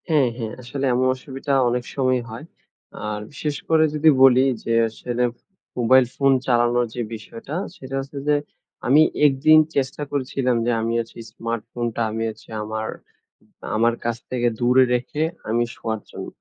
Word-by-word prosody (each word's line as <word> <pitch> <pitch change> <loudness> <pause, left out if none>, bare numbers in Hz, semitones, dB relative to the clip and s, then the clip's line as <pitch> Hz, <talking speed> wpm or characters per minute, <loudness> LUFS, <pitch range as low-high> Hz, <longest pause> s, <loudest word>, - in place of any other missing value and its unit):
হ্যাঁ, 145 -6 +4
হ্যাঁ। 115 -2 -4
আসলে 135 +3 -4
এমন 125 +1 +2
অসুবিধা 135 +1 -4 0.2
অনেক 125 0 -1
সময় 130 -2 +1
হয়। 115 +7 -8 0.6
আর 105 0 -3
বিশেষ 145 0 -3
করে 160 -1 +5
যদি 155 +1 +4
বলি 130 0 +7 0.2
যে 115 - -1 0.2
আসলে 120 +2 -3 0.5
মোবাইল 130 +2 +5
ফোন 135 -1 +3
চালানোর 120 0 +2
যে 120 - -2
বিষয়টা, 115 +6 -8 0.2
সেটা 135 -8 -7
হচ্ছে 135 +1 -7
যে 150 - +4 0.5
আমি 140 +5 +6 0.3
একদিন 150 +3 +5 0.2
চেষ্টা 135 +1 -1
করেছিলাম 130 -2 0
যে 120 - +2
আমি 115 +1 -1
আজকে 115 0 -11
স্মার্টফোনটা 115 +1 -4
আমি 115 +1 -2
হচ্ছে 110 - -12
আমার 110 +1 -4 0.9
আমার 115 +2 +3
কাছ 120 -1 0
থেকে 120 -1 0
দূরে 125 +2 +5
রেখে 125 +5 -3 0.3
আমি 120 +2 +2
শোয়ার 110 -1 -4
জন্য। - - -7
125 Hz, 155 wpm, -22 LUFS, 115-135 Hz, 0.9 s, বলি